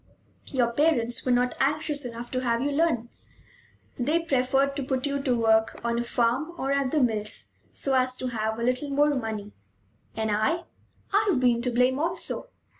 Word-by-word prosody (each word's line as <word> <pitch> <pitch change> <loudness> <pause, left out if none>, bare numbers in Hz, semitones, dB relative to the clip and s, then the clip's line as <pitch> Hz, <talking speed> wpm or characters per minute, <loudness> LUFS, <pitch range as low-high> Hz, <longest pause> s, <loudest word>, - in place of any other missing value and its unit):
"Your 245 -3 +1
parents 240 -4 +1
were - - +3
not 245 0 +2
anxious 290 0 0
enough 240 0 -7
to 255 - 0
have 235 -2 +1
you 290 - 0
learn. 280 -6 +1 0.9
They 305 +7 +1
preferred 270 -1 +1
to 280 - -2
put 260 0 -1
you 280 -1 -1
to 255 -3 +1
work 220 -1 +2
on 235 0 0
a - - 0
farm 245 +7 0
or 270 -2 -2
at 280 -2 +1
the 310 - +1
mills, 215 -5 -1 0.2
so 275 - -1
as 255 -1 +2
to 255 - -3
have 220 -1 -2
a 235 - -3
little 255 +4 0
more 290 +1 +3
money. 220 -5 -4 0.6
And 220 -1 -1
I? 220 +12 +1 0.5
I've 405 -8 +3
been 245 -2 +3
to 250 - 0
blame 250 +2 +2
also. 345 +9 -2
255 Hz, 185 wpm, -26 LUFS, 235-285 Hz, 0.9 s, were